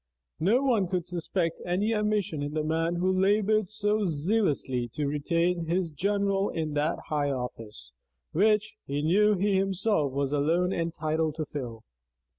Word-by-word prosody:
No 220 - +3
one 230 -9 +2
could 180 -2 -2
suspect 170 -1 -2
any 195 +6 0
ambition 210 -6 0
in 145 +1 -4
the 155 - 0
man 165 +2 0
who 185 +2 +1
labored 210 0 +2
so 210 0 0
zealously 150 - 0
to 150 - -1
retain 170 +4 0
his 175 0 0
general 200 +4 0
in 155 -2 -3
that 150 +3 0
high 145 -2 0
office, 115 - -6 0.4
which, 210 +4 +2
he 145 +1 -2
knew, 205 +6 +4
he 195 +1 +1
himself 195 -5 +1
was 140 +1 -1
alone 170 +6 +2
entitled 160 -2 -1
to 155 -1 -3
fill. 120 -7 -6
170 Hz, 150 wpm, -28 LUFS, 150-200 Hz, 0.4 s, knew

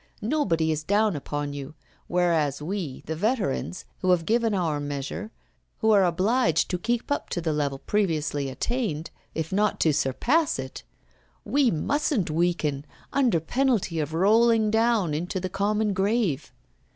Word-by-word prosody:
Nobody 180 - +1
is 155 0 -1
down 205 +1 +2
upon 145 0 -4
you; 140 +2 -7 0.3
whereas 165 -6 +1
we, 160 -3 -4
the 160 - -3
veterans, 190 - -1
who 185 - -1
have 175 -2 +3
given 225 0 +2
our 165 -6 0
measure, 145 +8 -4 0.5
who 220 -1 +2
are 200 -2 +6
obliged 185 - +2
to 180 - -1
keep 235 +7 -2
up 285 - -1
to - - -2
the 160 -2 -1
level 145 -2 -1
previously 150 -7 -1
attained, 170 - -2 0.2
if 160 0 -3
not 210 +2 +1
to 155 - +4
surpass 255 - +1
it, - - -6 0.6
we 280 -3 +3
mustn't 220 - 0
weaken 155 -4 0 0.3
under 255 -10 +3
penalty 220 - 0
of 155 +1 -2
rolling 220 +4 +4
down 220 -7 +2
into 175 +5 -2
the 185 0 -3
common 205 +2 0
grave. 195 - 0
180 Hz, 150 wpm, -26 LUFS, 155-220 Hz, 0.6 s, are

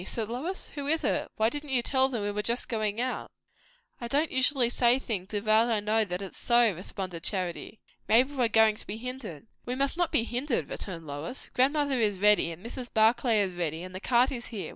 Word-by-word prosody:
said 220 +3 -3
Lois. 310 +11 -4
"Who 285 -2 -6
is 320 +2 +1
it? - - 0
why 220 +1 +3
didn't 290 +3 -6
you 255 -3 +1
tell 265 0 +2
them 235 -6 -3
we 205 - -1
were 210 +1 -2
just 235 +3 -1
going 215 -2 -1
out?" 255 +1 -2 0.7
"I 235 - -5
don't 290 +6 0
usually 260 -1 +3
say 245 0 +4
things 210 -7 -4
without 215 +2 +2
I 225 -2 +2
know 215 +2 +2
that 180 0 -4
it's 195 - -8
so," 235 -3 +4
responded 185 0 -6
Charity. 185 +2 -2 0.3
"Maybe 255 +6 +4
we're 250 -4 +2
going 220 -1 +4
to - - -11
be 205 - -4
hindered." 240 - -7 0.2
"We 245 - -3
must 275 +4 0
not 350 -2 +1
be 225 - +3
hindered," 245 +3 -2
returned 170 -5 -5
Lois. 145 - -6
"Grandmother 275 0 +2
is 210 -3 +1
ready, 210 -3 +4
and 170 +6 -11
Mrs. 245 +1 -6
Barclay 225 0 +3
is 190 -2 -1
ready, 170 -1 -3
and 185 0 -9
the 185 - -5
cart 245 +5 +3
is 245 -3 -5
here. 200 -8 -6
230 Hz, 220 wpm, -28 LUFS, 205-255 Hz, 0.7 s, say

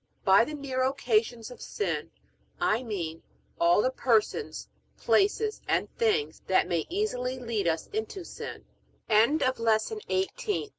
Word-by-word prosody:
By 195 +3 +7
the 305 - -5
near 270 -3 -3
occasions 240 -3 0
of 245 - -11
sin 420 - -3 0.5
I 255 -10 +2
mean 175 -9 -4 0.4
all 170 +4 +4
the 255 - +2
persons, 245 - 0 0.3
places, 425 +2 +2
and - - 0
things 440 -1 0
that - - +3
may - - -1
easily 260 -11 -1
lead 230 -7 -2
us 160 -1 0
into 415 -3 -3
sin. - - -8
255 Hz, 115 wpm, -28 LUFS, -, 0.5 s, By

